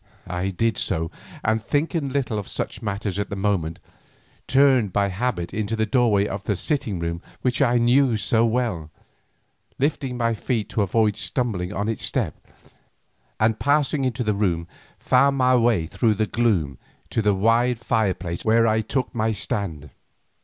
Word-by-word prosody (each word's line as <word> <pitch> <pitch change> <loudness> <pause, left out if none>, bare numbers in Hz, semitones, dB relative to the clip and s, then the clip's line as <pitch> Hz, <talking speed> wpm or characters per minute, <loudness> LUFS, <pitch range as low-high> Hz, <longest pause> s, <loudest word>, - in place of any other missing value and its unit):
I 90 +1 -2
did 110 +4 0
so, 80 -3 -1 0.3
and 110 +1 +1
thinking 145 +4 -1
little 130 -5 -1
of 100 - -7
such - - -4
matters 100 -2 -3
at 100 - -2
the - - -4
moment, 95 -5 -1 0.7
turned 130 -6 +4
by 100 +2 +1
habit 95 -3 -2
into 110 +1 -1
the 110 0 +1
doorway 110 -4 +3
of 100 0 -5
the 100 - 0
sitting 120 - -1
room 85 0 -3 0.2
which 130 +2 +1
I 125 -3 +4
knew 120 0 +3
so 110 +2 +2
well, 115 -9 -1 0.9
lifting 135 -2 -1
my 115 -1 +1
feet 110 0 -2
to 110 - 0
avoid 105 +1 +1
stumbling 105 -8 -2
on 105 0 -2
its 115 - -3
step, - - -1 1.1
and 110 0 +2
passing 145 0 +2
into 125 -2 -1
the 105 -2 +1
room 90 -5 0 0.3
found 140 +2 +3
my 130 -1 +4
way 115 -8 +3
through 110 +6 +1
the 110 +1 +1
gloom 95 - 0 0.3
to - - +1
the 105 -2 +2
wide 115 +4 +2
fireplace 95 -7 -1
where 115 +1 +4
I 110 0 +2
took 130 +4 -2
my 110 -2 0
stand. 95 - -4
110 Hz, 165 wpm, -23 LUFS, 100-125 Hz, 1.1 s, turned